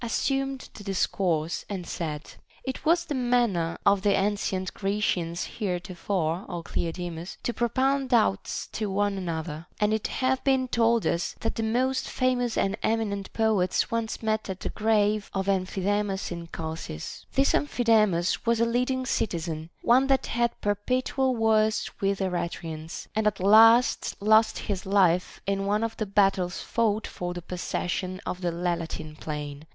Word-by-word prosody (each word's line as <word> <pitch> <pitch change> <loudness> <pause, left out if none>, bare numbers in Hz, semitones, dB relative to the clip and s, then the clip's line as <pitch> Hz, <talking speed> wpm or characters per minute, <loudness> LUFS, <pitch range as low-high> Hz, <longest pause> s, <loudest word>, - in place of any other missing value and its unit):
assumed 270 +3 -1
the 205 - -10
discourse, 180 -4 0
and 190 -4 -4
said: 155 -3 -5 0.3
It 265 -1 -5
was 340 +2 +3
the 300 - -3
manner 240 -10 +1
of 200 -1 +4
the 200 0 +3
ancient 195 -2 -1
Grecians 195 -4 -1
heretofore, 180 -3 -2
Ο 170 - -4
Cleode 175 +1 -3
mus, 170 +3 -7
to 240 - -1
propound 260 +3 +1
doubts 100 - +1
to 215 -2 -2
one 205 +1 +1
another; 165 -3 -4
and 210 +1 +2
it 220 - 0
hath 260 0 0
been 265 -2 +2
told 230 -1 +2
us, 170 0 0
that 225 - -1
the - - -3
most 255 +4 0
famous 245 -2 0
and 195 +1 +1
eminent 205 -3 -1
poets 215 -5 +1
once 230 -1 -2
met 215 -1 0
at 190 -1 -5
the - - -3
grave 215 -1 +1
of 195 0 -1
Amphidamas 195 +1 0
in 170 -1 -6
Chalcis. 160 - -6
This 270 +1 +4
Amplii 250 -4 0
damas 210 -6 +3
was 235 -1 +2
a 230 - +4
leading 250 +2 0
citizen, 165 -8 -2
one 255 +3 +5
that 270 -1 +2
had 235 0 -1
perpetual 255 +5 0
wars 220 -1 +2
with 195 0 +1
the 190 - -1
Eretrians, 165 -3 -4
and 215 0 +2
at 205 -2 0
last 225 +5 +6
lost 215 +2 +4
his 195 -3 -3
life 185 -3 +2
in 195 0 -1
one 210 +2 +1
of 225 0 -2
the 215 - -2
battles 195 -2 +2
fought 220 -2 0
for 175 0 -5
the 175 - -5
possession 185 +1 -3
of 180 - -4
the 175 -1 0
Lelantine 170 -3 -3
plain. 150 -1 -6
205 Hz, 160 wpm, -27 LUFS, 175-230 Hz, 0.3 s, last